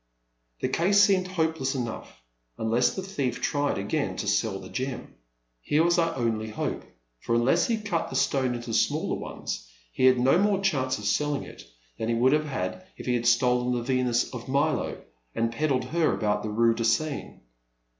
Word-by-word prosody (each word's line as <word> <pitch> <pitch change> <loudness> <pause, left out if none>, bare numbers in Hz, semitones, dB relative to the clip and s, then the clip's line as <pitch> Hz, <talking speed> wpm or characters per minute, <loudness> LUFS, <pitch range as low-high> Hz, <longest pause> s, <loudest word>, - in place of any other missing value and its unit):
The - - +1
case 195 +4 +3
seemed 195 -3 +4
hopeless 160 -7 -1
enough, 115 - -6 0.3
un 110 - -2
less 125 +2 +2
the 190 - -4
thief 140 -11 -2
tried 145 0 0
again 105 +10 -2
to 105 - -4
sell 100 0 +1
the 95 -1 -10
gem. 130 +4 -5 0.5
Here 150 - +2
was 175 +1 +3
our 165 -1 +1
only 115 -3 -1
hope, 110 - -3 0.4
for, 115 - -1
unless 125 +9 +3
he 230 - +1
cut 195 -6 -2
the - - -6
stone 130 -2 +1
into 120 -1 -5
smaller - - +1
ones, - - -6 0.2
he 130 - +1
had 130 -1 +6
no 135 +7 +4
more 200 -1 +2
chance 135 -10 0
of 105 - -8
sell 145 +9 +1
ing 140 - -4
it - - -12 0.3
than 110 - -2
he 115 - +1
would 130 +4 +4
have 155 0 +2
had 145 +6 -4
if - - -9
he 125 - +1
had 120 -1 0
stolen 125 +1 +3
the 120 - -2
Venus 125 -1 +1
of 120 -2 -7
Milo 140 +2 0 0.4
and 115 0 0
peddled 135 0 0
her 165 -1 +1
about 105 -1 0
the 110 - -4
rue 115 +2 +3
de 115 0 -3
Seine. 140 +6 -1
130 Hz, 195 wpm, -27 LUFS, 115-155 Hz, 0.5 s, had